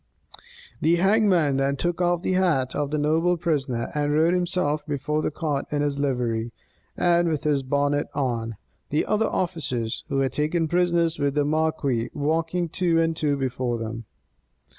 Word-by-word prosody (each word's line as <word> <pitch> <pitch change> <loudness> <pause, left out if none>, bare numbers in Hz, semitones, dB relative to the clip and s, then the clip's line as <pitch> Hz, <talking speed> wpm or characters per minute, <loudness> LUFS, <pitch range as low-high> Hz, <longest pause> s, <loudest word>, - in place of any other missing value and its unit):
The 165 +2 +4
hangman 185 -6 +3
then 135 +1 +1
took 175 +4 -1
off 175 0 +1
the - - 0
hat 165 -9 +1
of 145 -1 -1
the 150 - -1
noble 160 +4 +2
prisoner, 135 -8 -1
and 145 -1 0
rode 160 +3 +3
himself 175 -4 0
before 150 +1 -1
the - - 0
cart 150 -3 -2
in 145 0 0
his 140 -1 -1
livery, 120 -4 -1 0.5
and 175 -1 +3
with 155 -3 -2
his 145 -2 +1
bonnet 145 +2 0
on; 115 -5 -2 0.3
the 150 - +1
other 215 +1 +1
officers, 135 -11 -2
who 140 - -3
were 135 0 +2
taken 155 +5 0
prisoners 170 -1 +1
with 140 -1 0
the 145 -1 +2
marquis, 150 -6 0
walking 165 +4 0
two 170 0 +1
and 165 0 +1
two 150 -3 0
before 125 -2 -2
them. 115 0 -5
150 Hz, 165 wpm, -24 LUFS, 135-170 Hz, 0.5 s, The